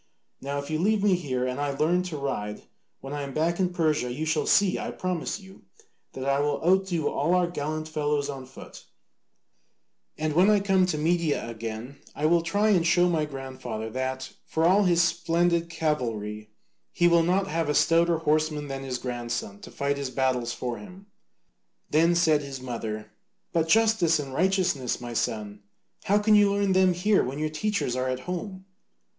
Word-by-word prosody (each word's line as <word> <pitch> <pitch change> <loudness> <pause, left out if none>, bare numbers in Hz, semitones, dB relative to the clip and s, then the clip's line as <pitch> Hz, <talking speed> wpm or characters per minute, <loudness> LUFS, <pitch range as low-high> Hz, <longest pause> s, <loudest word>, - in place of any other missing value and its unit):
Now 140 +1 -3
if 140 +2 -5
you 155 - 0
leave 205 +3 +2
me 205 -2 +4
here 130 -8 -1
and 125 +1 -3
I 140 -1 -2
learn 170 +5 +2
to 170 -4 -5
ride, 105 -7 -4 0.4
when 135 +1 -7
I 145 - -3
am 140 -1 -6
back 165 +3 0
in 185 -1 +2
Persia 155 -7 0
you 150 +6 -3
shall 155 -1 0
see, 200 -2 +3
I - - -4
promise 185 +1 -3
you, 190 -1 -15 0.5
that 130 - -5
I 140 0 +2
will 145 0 0
outdo 180 -4 +2
all 160 +6 +1
our 180 -1 +3
gallant 155 -2 -4
fellows 150 -2 -1
on 135 -2 -7
foot, 130 - -12 1.3
and 155 -1 -1
when 180 +6 +5
I 210 -1 +5
come 190 -2 +2
to 155 - -1
Media 160 -4 0
again 115 +3 -6 0.2
I 150 - -2
will 170 +2 +4
try 205 +6 +1
and 180 -5 +3
show 175 +1 +4
my 160 -3 +1
grandfather 130 -6 -6
that, 130 +1 -4
for 160 +1 0
all 195 +4 +4
his 170 -1 +4
splendid 170 0 +1
cavalry, 115 -10 -2 0.4
he 175 - +3
will 170 -1 +5
not 185 +4 +1
have 165 -4 -2
a 150 - +1
stouter 170 0 +3
horseman 155 -2 0
than 135 0 -4
his 130 -2 -3
grandson 120 -5 -4
to - - -11
fight 140 0 -2
his 140 -2 -3
battles 130 -2 0
for 120 -2 -4
him." 180 - -12 0.9
Then 165 +3 +4
said 160 -3 +3
his 140 -2 -7
mother, 115 -4 -5 0.4
"But 165 -1 +1
justice 215 -5 +4
and 140 -3 -5
righteousness, 180 -6 +1
my 120 -1 -7
son, 105 -2 -3 0.4
how 205 - +3
can 210 +1 +3
you 205 -1 +6
learn 200 -1 +1
them 185 -1 +4
here 200 +3 +3
when 130 +3 -4
your 155 +1 -1
teachers 180 -6 -1
are 130 0 -1
at 130 0 -3
home?" 185 +4 -6
155 Hz, 185 wpm, -26 LUFS, 130-175 Hz, 1.3 s, you